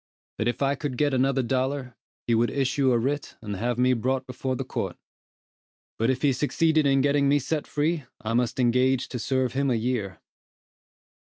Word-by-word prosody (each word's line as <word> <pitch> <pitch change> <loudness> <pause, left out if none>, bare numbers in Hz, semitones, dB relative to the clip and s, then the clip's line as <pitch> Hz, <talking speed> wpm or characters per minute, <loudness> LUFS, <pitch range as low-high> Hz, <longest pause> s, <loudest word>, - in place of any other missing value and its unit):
That 110 - 0
if 120 +3 -1
I 140 0 +2
could 140 -2 -4
get 145 0 +2
another 135 +1 +2
dollar, 130 +1 -2 0.3
he 120 - +1
would 115 +1 +3
issue 135 -1 +1
a 120 - +3
writ 140 +5 -2
and 105 -3 -5
have 120 +3 -1
me 125 +1 +3
brought 130 +2 -1
before 130 0 -3
the - - -3
court; - - -4 1.0
but 115 +2 +2
if 130 +1 -1
he 140 -2 +4
succeeded 155 +2 +2
in 135 -1 +3
getting 140 0 +2
me 145 - +4
set 150 +2 -2
free, 150 0 -1
I 115 -2 -3
must 120 +1 0
engage 125 +1 +2
to 125 - -4
serve 130 +2 0
him 140 +1 +1
a 125 - +2
year. 115 -4 -2
130 Hz, 190 wpm, -26 LUFS, 120-140 Hz, 1.0 s, he